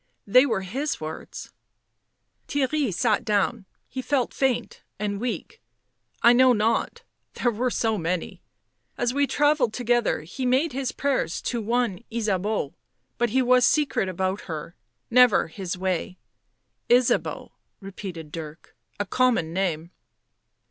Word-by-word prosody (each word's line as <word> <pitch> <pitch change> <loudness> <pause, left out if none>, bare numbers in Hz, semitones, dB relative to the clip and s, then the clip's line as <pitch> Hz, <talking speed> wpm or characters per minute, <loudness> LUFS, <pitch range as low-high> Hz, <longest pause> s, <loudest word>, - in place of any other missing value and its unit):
They 255 +7 +6
were 210 -6 0
his 270 +11 -3
words." 155 0 -7 1.0
Theirry 285 -2 0
sat 215 +3 +1
down; 210 0 0 0.2
he 260 - -5
felt 260 -2 0
faint 265 -3 -1 0.2
and 205 -1 -2
weak. 245 -1 -4 0.3
" - - -33
I 235 - +8
know 255 +1 +6
not. 230 - 0 0.3
There 240 - +1
were 245 +3 -1
so 225 -3 0
many. 170 +1 -3 0.6
As 245 0 0
we 280 +1 +2
travelled 290 -6 +2
together 240 -5 +1
he 180 - -7
made 260 +4 +2
his 265 -1 -2
prayers 275 -12 -1
to 240 -2 -2
one 230 -2 -1
Ysabeau, 210 -7 -1 0.5
but 240 0 +2
he 260 +4 +2
was 250 0 +4
secret 285 -9 +2
about 185 +2 -2
her 160 +1 -6 0.2
— 120 - -50
never 245 -9 +4
his 185 +1 -5
way." 185 0 -2 0.4
" - - -50
Ysabeau," 245 0 +2 0.3
repeated 185 -5 -8
Dirk. 160 -1 -9
" - - -39
A 205 - 0
common 230 -7 +1
name." 170 -3 -1
225 Hz, 140 wpm, -25 LUFS, 185-255 Hz, 1.0 s, I